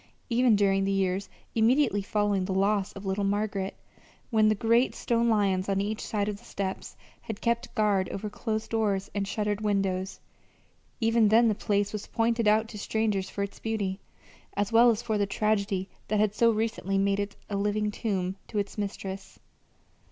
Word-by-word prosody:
Even 240 Hz, -1 st, +4 dB
during 195 Hz, -1 st, +3 dB
the 195 Hz, -, 0 dB
years 195 Hz, 0 st, 0 dB, 0.2 s
immediately 230 Hz, -1 st, +3 dB
following 205 Hz, -1 st, 0 dB
the 190 Hz, 0 st, -2 dB
loss 200 Hz, 0 st, +1 dB
of 195 Hz, 0 st, -9 dB
little 195 Hz, +1 st, -1 dB
Margaret, 200 Hz, -1 st, -1 dB, 0.6 s
when 215 Hz, -2 st, +4 dB
the 215 Hz, -, +3 dB
great 230 Hz, +4 st, +2 dB
stone 235 Hz, 0 st, +1 dB
lions 200 Hz, -3 st, +1 dB
on 195 Hz, 0 st, +1 dB
each 210 Hz, +2 st, -2 dB
side 205 Hz, -2 st, -1 dB
of 210 Hz, -1 st, -3 dB
the -, -, -20 dB
steps 190 Hz, -1 st, -5 dB, 0.2 s
had 220 Hz, -3 st, -6 dB
kept 235 Hz, 0 st, -1 dB
guard 205 Hz, -4 st, +2 dB
over 210 Hz, +2 st, -4 dB
closed 220 Hz, +1 st, -3 dB
doors 205 Hz, -4 st, 0 dB
and 200 Hz, -1 st, -2 dB
shuttered 210 Hz, +1 st, -1 dB
windows, 195 Hz, -2 st, -1 dB, 0.8 s
even 225 Hz, -1 st, +3 dB
then 225 Hz, +2 st, +5 dB
the -, -, +2 dB
place 205 Hz, -1 st, 0 dB
was 210 Hz, -1 st, -5 dB
pointed 230 Hz, -1 st, +1 dB
out 215 Hz, +1 st, +4 dB
to 210 Hz, -, -8 dB
strangers 205 Hz, -3 st, -1 dB
for 200 Hz, -, -3 dB
its 200 Hz, -, -7 dB
beauty, 205 Hz, -4 st, -2 dB, 0.6 s
as 205 Hz, +2 st, 0 dB
well 235 Hz, +2 st, +7 dB
as 230 Hz, 0 st, 0 dB
for 220 Hz, -3 st, -1 dB
the 200 Hz, -, +1 dB
tragedy 200 Hz, -2 st, 0 dB, 0.2 s
that 215 Hz, 0 st, +1 dB
had 210 Hz, -1 st, +2 dB
so 230 Hz, +2 st, +4 dB
recently 220 Hz, -3 st, -1 dB
made 200 Hz, 0 st, +2 dB
it 200 Hz, 0 st, -3 dB
a 205 Hz, -, -3 dB
living 210 Hz, +1 st, 0 dB
tomb 190 Hz, -4 st, -2 dB
to 215 Hz, -, -5 dB
its 205 Hz, +1 st, -2 dB
mistress. 195 Hz, -1 st, -5 dB
205 Hz, 180 wpm, -28 LUFS, 195-220 Hz, 0.8 s, well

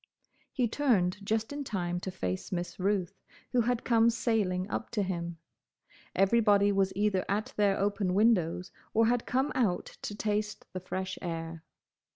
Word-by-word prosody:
He 250 Hz, -3 st, +1 dB
turned 205 Hz, -8 st, +1 dB
just 220 Hz, +5 st, -1 dB
in 285 Hz, 0 st, -3 dB
time 175 Hz, -7 st, -2 dB
to 190 Hz, -, -5 dB
face 95 Hz, -, -4 dB
Miss 175 Hz, 0 st, -3 dB
Ruth, 195 Hz, -1 st, -1 dB, 0.3 s
who 250 Hz, -, +3 dB
had 240 Hz, +1 st, 0 dB
come 230 Hz, -1 st, +4 dB
sailing 210 Hz, -6 st, 0 dB
up 220 Hz, -, -3 dB
to 210 Hz, -3 st, +1 dB
him. 170 Hz, -3 st, -3 dB, 0.8 s
Everybody 205 Hz, 0 st, +4 dB
was 195 Hz, -1 st, +2 dB
either 205 Hz, -2 st, +1 dB
at 215 Hz, +7 st, -1 dB
their 200 Hz, -2 st, +3 dB
open 200 Hz, -2 st, 0 dB
windows, 190 Hz, -5 st, +2 dB, 0.2 s
or 225 Hz, +1 st, +5 dB
had 240 Hz, +1 st, +1 dB
come 265 Hz, +3 st, +1 dB
out 210 Hz, -9 st, +1 dB, 0.2 s
to 205 Hz, -, -4 dB
taste 210 Hz, 0 st, -2 dB
the 185 Hz, -, -3 dB
fresh 185 Hz, +1 st, -4 dB
air. 165 Hz, -1 st, -5 dB
200 Hz, 160 wpm, -30 LUFS, 180-225 Hz, 0.8 s, or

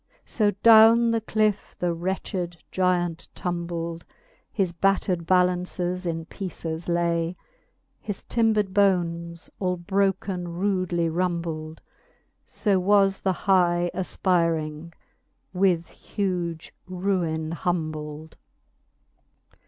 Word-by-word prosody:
So 210 Hz, -3 st, +1 dB
downe 230 Hz, +1 st, +7 dB
the 230 Hz, -1 st, 0 dB
cliffe 215 Hz, -2 st, 0 dB
the 175 Hz, -1 st, 0 dB
wretched 175 Hz, 0 st, -3 dB
Gyant 175 Hz, -2 st, 0 dB
tumbled; 170 Hz, -1 st, -4 dB, 0.5 s
His 185 Hz, -4 st, -1 dB
battred 180 Hz, -1 st, 0 dB
ballances 180 Hz, 0 st, +1 dB
in 165 Hz, -1 st, -3 dB
peeces 170 Hz, -3 st, -5 dB
lay, 170 Hz, 0 st, 0 dB, 0.6 s
His 205 Hz, -3 st, -5 dB
timbered 215 Hz, -4 st, +1 dB
bones 170 Hz, -4 st, 0 dB
all 180 Hz, -2 st, 0 dB
broken 190 Hz, 0 st, -1 dB
rudely 175 Hz, -1 st, 0 dB
rumbled: 165 Hz, -2 st, -3 dB, 0.7 s
So 200 Hz, -3 st, +1 dB
was 195 Hz, 0 st, +3 dB
the 190 Hz, -, +1 dB
high 175 Hz, -2 st, +3 dB
afpyring 170 Hz, -4 st, -1 dB, 0.6 s
with 180 Hz, -3 st, +1 dB
huge 175 Hz, -5 st, -4 dB
ruine 175 Hz, -4 st, -1 dB
humbled. 155 Hz, -2 st, -4 dB
180 Hz, 90 wpm, -25 LUFS, 170-195 Hz, 0.7 s, downe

